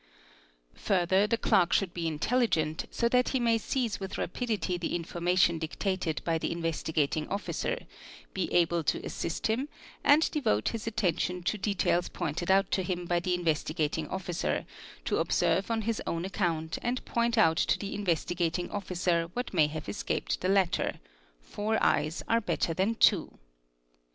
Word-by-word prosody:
Further 190 +1 +2
the 230 +1 +1
clerk 180 -6 +3
should 190 -4 +1
be 170 -1 -2
intelligent, 160 -2 0
so 235 - 0
that 250 +1 +3
he 265 - 0
may 230 -1 +3
seize 235 -4 -1
with 190 -1 -5
rapidity 210 -2 -2
the 175 -1 -2
information 175 0 +1
dictated 165 0 -2
by 165 -1 +1
the - - -2
Investigating 160 -2 -1
Officer, 190 -4 -2 0.6
be - - -2
able 170 -1 +2
to - - +2
assist 165 - -3
him, 250 +7 0 0.3
and 300 +3 +5
devote 110 - +1
his 230 -1 -5
attention 180 -4 0
to 195 - 0
details 200 -3 0
pointed 175 0 -3
out 195 +1 +4
to 190 - +2
him 180 -1 -3
by 175 0 +1
the 180 +1 0
Investigating 160 -2 -1
Officer, 180 -1 -2 0.4
to - - 0
observe 195 - +1
on 225 -1 0
his 225 0 -1
own 165 +1 -2
account 170 -5 -1
and 245 +1 -2
point 235 0 0
out 165 -7 +5
to - - +2
the 200 - -5
Investigating 175 -2 -1
Officer 180 -4 0
what 245 -3 -4
may 155 -4 +4
have 155 +1 -6
escaped - - -2
the 185 - 0
latter—four - - -1
eyes 155 +3 +1
are 230 +1 +3
better 170 -5 0
than 195 +7 +1
two. 200 -6 +3
180 Hz, 155 wpm, -29 LUFS, 165-210 Hz, 0.6 s, and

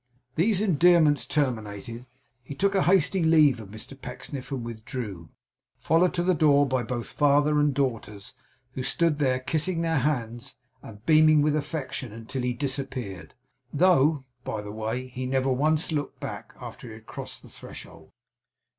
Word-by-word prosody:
These 190 - +2
endearments 170 -5 +4
terminated, 115 -4 -3 0.3
he 135 +3 -9
took 200 +6 +1
a 195 - +3
hasty 190 0 +3
leave 155 -6 +5
of 105 -3 -10
Mr 110 +6 -9
Pecksniff 130 +2 -8
and 130 -4 -3
withdrew, 110 - -6 0.5
followed 170 +3 +2
to 175 - 0
the 185 +1 +3
door 145 -3 +4
by 130 -2 0
both 120 0 -4
father 145 +1 +2
and 145 0 +3
daughters, 115 -7 -3 0.4
who 130 - -5
stood 155 +3 +1
there 130 -3 +2
kissing 165 +6 -1
their 165 -2 +1
hands 125 -2 -3 0.2
and 105 0 -13
beaming 155 -1 +6
with 150 0 +2
affection 145 -5 -4
until 115 +4 -6
he 125 0 0
disappeared; 130 - -5 0.4
though, 150 -3 +3 0.2
by 110 - -4
the 105 - -7
way, 110 +4 -3
he 130 0 -5
never 135 0 +1
once 155 +5 +1
looked 145 -2 -3
back, - - -7
after - - -9
he 110 - -9
had 110 0 -15
crossed - - -8
the - - -14
threshold. - - -12
135 Hz, 160 wpm, -26 LUFS, 120-155 Hz, 0.5 s, beaming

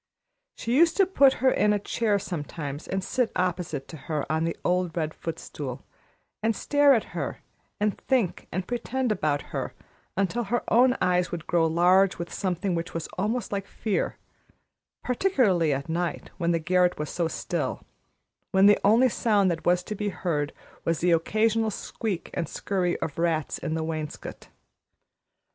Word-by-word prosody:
She 235 +2 -1
used 330 +3 +5
to 390 - +6
put 280 -8 +5
her 260 - +6
in 210 0 +3
a - - +2
chair 205 +1 0
sometimes 150 -5 -5
and 190 0 -2
sit 250 +3 0
opposite 175 -6 -1
to 160 - -8
her 150 +1 -3
on 160 +1 +1
the 165 - -2
old 180 -1 +1
red 155 -1 -1
footstool, 150 -5 -6 0.6
and 220 0 +1
stare 285 +2 +4
at 225 - -3
her - - -4 0.4
and 210 0 +1
think 245 -9 0
and 185 +1 -3
pretend 245 +1 -1
about 150 -8 0
her - - -3 0.4
until 200 +5 0
her 240 +4 0
own 250 +2 +5
eyes 180 0 +2
would 170 -2 -5
grow 165 -2 +2
large 180 +4 +4
with 170 -1 -6
something 185 0 -1
which 170 0 -3
was 165 - -3
almost 215 +3 -1
like 200 -1 -3
fear, 215 -4 -2 0.9
particularly 240 - +2
at 140 0 -2
night, 170 +1 -2
when 170 -1 +1
the 170 - +3
garret 180 +2 +2
was 150 0 -4
so 170 -2 0
still, - - -3 0.7
when 190 0 +4
the 205 0 +6
only 225 +6 +6
sound 210 -5 +2
that 160 -1 -4
was 180 0 +3
to 215 - -5
be 210 0 -2
heard 165 -5 -2 0.3
was 165 -1 +1
the 175 +1 +2
occasional 220 +6 +2
squeak 205 -2 -4
and 165 - -2
scurry 185 -3 -1
of 150 0 -3
rats 165 -3 0
in 160 - -2
the 160 - -1
wainscot. 155 -2 -5
180 Hz, 170 wpm, -26 LUFS, 165-215 Hz, 0.9 s, to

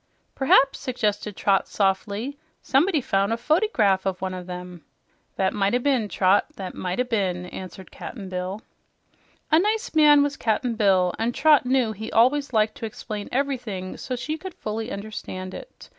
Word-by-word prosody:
"P'raps," 270 0 +4
suggested 210 -5 -2
Trot 195 0 +2
softly, 200 +6 -1 0.3
"someone 310 +5 +3
found 195 -1 +1
a 230 - +1
fotygraph 235 - +2
of 185 -1 -2
one 185 0 -3
of 180 0 -7
'em." 180 -1 -8 0.5
"That 190 -1 +1
might 205 +2 +1
o' - - +5
been, 250 -4 +1
Trot, 190 +1 +3
that 190 -2 -6
might 180 +3 -4
o' - - +4
been," 195 -7 -1
answered 185 0 -9
Cap'n 200 -6 -8
Bill. 185 +3 -4 0.9
A 315 - +6
nice 435 +5 0
man 295 -2 +6
was 285 -1 -2
Cap'n 235 +2 0
Bill, 190 -5 +3
and 230 +2 -1
Trot 300 -5 +4
knew 255 -3 +2
he 220 +1 -7
always 275 +5 +3
liked 215 -2 +2
to 225 - -4
explain 210 -1 -7
everything 245 -9 -2
so 255 - -4
she 305 +6 -4
could 375 0 -8
fully 220 +2 -4
understand 195 -2 -6
it. - - -11
220 Hz, 170 wpm, -24 LUFS, 190-265 Hz, 0.9 s, A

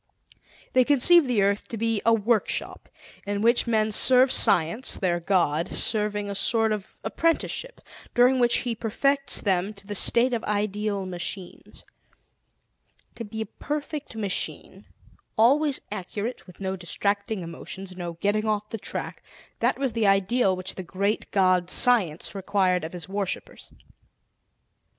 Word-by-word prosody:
They 255 - +5
conceive 290 +4 +6
the 230 -5 +2
earth 200 +1 0
to 230 - -6
be 225 -1 0
a 230 - +4
workshop 225 0 -1 0.4
in 205 +1 -2
which 235 +1 +3
men 220 -2 +1
serve 255 +4 +5
Science, 175 +10 +2
their 175 -3 0
God, 170 -2 +1
serving 210 -1 0
a 200 - -4
sort 225 +2 +1
of 210 -3 -5
apprenticeship 335 +9 -1 0.3
during 250 +2 +4
which 240 -1 +3
He 240 - -1
perfects 275 +5 0
them 195 +1 0
to 200 0 -11
the 205 - -5
state 240 +5 +3
of 230 - -2
ideal 210 -1 -2
machines. 180 0 -7 1.3
To 230 - -7
be 220 +1 -6
a - - -2
perfect 295 -1 -6
machine, 205 -3 -4 0.5
always 275 +5 +3
accurate, 210 +4 -5
with 180 - -15
no 190 -1 -3
distracting 200 +4 -2
emotions, 185 +3 -8
no 175 -2 -5
getting 205 +5 -1
off 210 -1 -2
the 225 - -4
track - - -6 0.4
that - - +1
was 265 -3 -1
the 220 -2 +1
ideal 195 +1 +2
which 185 +1 -4
the - - -6
Great 200 +4 -2
God 185 -2 +2
Science 195 -12 +2
required 190 -2 0
of 160 - -6
his 175 -2 -8
worshippers. 195 -1 -5
210 Hz, 145 wpm, -25 LUFS, 190-235 Hz, 1.3 s, conceive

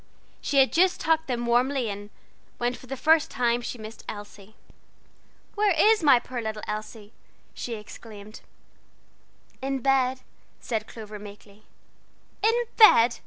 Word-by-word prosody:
She 280 - -1
had 265 -1 +5
just 365 +2 +3
tucked 320 0 +1
them 240 -2 -2
warmly 250 +1 +1
in, 205 0 -6 0.5
when 240 +1 -1
for 255 - -12
the 270 +1 -5
first 315 +3 +3
time 240 -2 0
she 245 - -6
missed 220 0 -10
Elsie. 205 0 -10 1.0
"Where 410 -3 +2
is 435 +5 +5
my 280 -6 +6
poor 245 0 -6
little 215 -1 -5
Elsie?" 215 0 -7 0.4
she 235 - -5
exclaimed. 215 -1 -11 1.2
"In 270 +1 -2
bed," 265 -1 +1 0.4
said 220 -2 -3
Clover, 215 -2 -9
meekly. 205 0 -14 0.8
"In 455 +3 +2
bed!" 240 - +7
240 Hz, 135 wpm, -26 LUFS, 215-275 Hz, 1.2 s, bed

